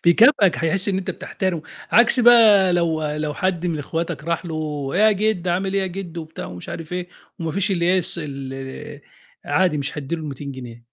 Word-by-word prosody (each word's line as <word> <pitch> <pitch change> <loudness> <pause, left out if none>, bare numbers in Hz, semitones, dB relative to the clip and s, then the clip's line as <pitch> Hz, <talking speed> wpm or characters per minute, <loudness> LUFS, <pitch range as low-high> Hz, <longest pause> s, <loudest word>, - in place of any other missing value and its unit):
بيكافئك، 200 - +5
هيحس 180 +4 +1
إن 190 -1 0
أنت 190 - -4
بتحترمه، 180 -4 -3 0.3
عكس 240 +2 +5
بقى 220 -6 +6
لو 165 -3 0
لو 150 -1 -3
حد 180 -2 -1
من 160 -3 -2
أخواتك 160 +1 -4
راح 170 +2 -2
له 150 -4 -4
إيه 195 - +2
يا 215 0 +6
جدو، 200 -3 0
عامل 190 +2 -1
إيه 195 - +2
يا - - -1
جدو؟ 175 -2 -6
وبتاع 160 +1 -8
مش 90 0 -10
عارف 165 +1 -7
إيه، 180 0 -4 0.3
وما 165 -1 -3
فيش 200 +1 0
اللي 170 -3 0
هي 185 +1 +4
الس 170 -1 -1
ال 135 -1 -7 0.4
عادي 180 -6 +1
مش 140 +2 -3
هيدّي 150 +4 -3
له 160 - -7
ال200 140 -1 -6
جنيه. 120 -3 -10
170 Hz, 205 wpm, -21 LUFS, 150-190 Hz, 0.4 s, بقى